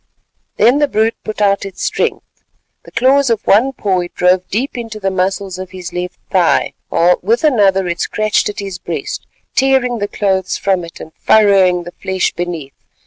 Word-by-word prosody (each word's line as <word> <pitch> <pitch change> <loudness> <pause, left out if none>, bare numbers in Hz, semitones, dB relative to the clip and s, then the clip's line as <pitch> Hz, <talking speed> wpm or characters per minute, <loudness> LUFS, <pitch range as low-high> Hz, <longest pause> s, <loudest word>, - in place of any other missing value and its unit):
Then 245 +6 +4
the 295 - +3
brute 225 -3 +1
put 215 -1 -5
out 200 0 +2
its 195 -2 -7
strength. - - -1 0.6
The - - -14
claws 270 +1 +3
of 230 -3 -1
one 235 +7 +4
paw 195 -7 -1
it 175 0 -6
drove 180 0 +2
deep 245 +8 -2
into 225 -3 -6
the 195 -1 -1
muscles 190 0 -2
of 185 -1 -6
his 185 -1 -8
left 180 0 -4
thigh, 180 -3 +2 0.2
while 175 +2 +3
with 225 - +1
another 200 - +3
it 170 0 -3
scratched 215 -1 0
at 205 - -7
his 195 -3 -5
breast, - - -5 0.3
tearing 260 -3 +2
the 205 - -1
clothes 190 -3 -1
from 190 -3 0
it 170 - -11
and 160 - -10
furrowing 195 -4 +4
the 175 - -9
flesh 190 -1 0
beneath. 170 -6 -5
195 Hz, 185 wpm, -16 LUFS, 180-220 Hz, 0.6 s, Then